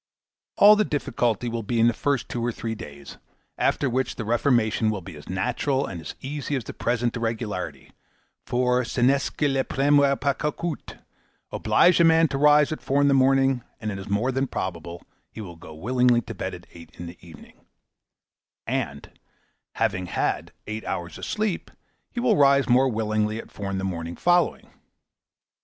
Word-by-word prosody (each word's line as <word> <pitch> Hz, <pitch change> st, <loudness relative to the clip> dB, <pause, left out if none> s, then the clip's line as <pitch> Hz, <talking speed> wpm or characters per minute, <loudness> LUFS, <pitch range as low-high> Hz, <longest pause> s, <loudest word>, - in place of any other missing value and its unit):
All 210 Hz, +1 st, +8 dB
the 215 Hz, -, +3 dB
difficulty 120 Hz, -, -1 dB
will 115 Hz, 0 st, -2 dB
be 115 Hz, +2 st, -2 dB
in 115 Hz, -, +5 dB
the 120 Hz, -, +4 dB
first 140 Hz, 0 st, -1 dB
two 120 Hz, -, -4 dB
or 120 Hz, -, 0 dB
three 115 Hz, 0 st, -4 dB
days; 70 Hz, -9 st, -10 dB, 0.4 s
after 140 Hz, -, +1 dB
which 130 Hz, 0 st, -1 dB
the 115 Hz, -, -5 dB
reformation 115 Hz, -2 st, +2 dB
will 105 Hz, -3 st, -2 dB
be 95 Hz, -3 st, -10 dB
as 75 Hz, -, -12 dB
natural 125 Hz, +8 st, 0 dB
and 85 Hz, -4 st, -6 dB
easy 145 Hz, +1 st, -3 dB
as 130 Hz, -, -2 dB
the -, -, -8 dB
present 120 Hz, 0 st, -1 dB
irregularity; 115 Hz, -4 st, -4 dB, 0.5 s
for, 125 Hz, 0 st, +1 dB
ce 120 Hz, -, -7 dB
n'est 135 Hz, +3 st, +3 dB
que 150 Hz, -, +2 dB
le 135 Hz, -1 st, +1 dB
premier 140 Hz, +1 st, +3 dB
pas 140 Hz, +1 st, 0 dB
qui 150 Hz, -, -1 dB
coûte. 170 Hz, -3 st, -5 dB, 0.5 s
Oblige 175 Hz, 0 st, +4 dB
a -, -, +6 dB
man 165 Hz, 0 st, +5 dB
to 135 Hz, -, -2 dB
rise 150 Hz, 0 st, +5 dB
at 155 Hz, -, -4 dB
four 140 Hz, +1 st, 0 dB
in 140 Hz, 0 st, +4 dB
the -, -, +4 dB
morning, 135 Hz, -1 st, +3 dB, 0.2 s
and 110 Hz, -1 st, -3 dB
it 100 Hz, -, -5 dB
is 95 Hz, -, -8 dB
more 105 Hz, +6 st, +1 dB
than 135 Hz, +1 st, 0 dB
probable 85 Hz, -5 st, -5 dB, 0.3 s
he -, -, -11 dB
will 90 Hz, -5 st, -8 dB
go 80 Hz, -, -12 dB
willingly 125 Hz, +6 st, +2 dB
to 105 Hz, -, -8 dB
bed -, -, -4 dB
at -, -, -13 dB
eight 85 Hz, -1 st, -13 dB
in 85 Hz, -, -6 dB
the 85 Hz, +1 st, -10 dB
evening; 85 Hz, -3 st, -15 dB, 1.0 s
and, 70 Hz, 0 st, -4 dB, 0.6 s
having 90 Hz, 0 st, 0 dB
had -, -, -2 dB
eight 110 Hz, +1 st, -5 dB
hours 85 Hz, -1 st, -5 dB
sleep, 210 Hz, -4 st, -2 dB, 0.4 s
he 245 Hz, -, -5 dB
will 240 Hz, -5 st, +3 dB
rise 140 Hz, -1 st, +5 dB
more 130 Hz, +2 st, +4 dB
willingly 110 Hz, -1 st, -1 dB
at -, -, -9 dB
four 100 Hz, -1 st, -5 dB
in 95 Hz, -, -2 dB
the 95 Hz, -, -3 dB
morning 85 Hz, -3 st, -4 dB
following. 175 Hz, -1 st, +1 dB
120 Hz, 185 wpm, -25 LUFS, 105-140 Hz, 1.0 s, All